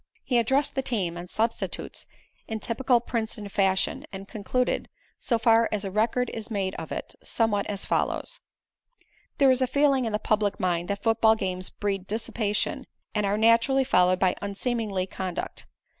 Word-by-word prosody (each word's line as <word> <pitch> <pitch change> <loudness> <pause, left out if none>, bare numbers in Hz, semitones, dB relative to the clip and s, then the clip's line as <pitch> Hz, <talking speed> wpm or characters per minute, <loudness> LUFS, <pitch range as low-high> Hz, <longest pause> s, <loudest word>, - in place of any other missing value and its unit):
He 245 -2 +2
addressed 270 +5 +2
the 270 - 0
team 200 -10 -1
and 175 +1 -7
substitutes 225 +3 -2 0.4
in 220 -1 -3
typical 245 +2 +2
Princeton 220 -3 -3
fashion 195 -1 +1
and 195 0 -8
concluded, 245 +5 -1 0.3
so 235 - +1
far 225 0 +4
as 210 -1 -2
a 195 - -3
record 230 +4 +1
is 225 0 -6
made 195 -3 -1
of 160 - -7
it, - - -5
somewhat 210 -3 +1
as 200 -1 -2
follows: - - -1 1.0
"There 275 -3 +6
is 260 0 +2
a 255 - +3
feeling 275 -2 +3
in 225 - -1
the 210 - +1
public 210 -1 0
mind 175 -1 0
that 200 0 -3
football 225 -1 +4
games 185 -3 -2
breed 195 -2 -3
dissipation 215 -1 -1 0.3
and 210 -2 +1
are 200 +1 +1
naturally 230 +4 +4
followed 180 -7 +4
by 185 -1 +3
unseemly 200 -1 -2
conduct. 185 -1 -5
215 Hz, 165 wpm, -26 LUFS, 195-235 Hz, 1.0 s, There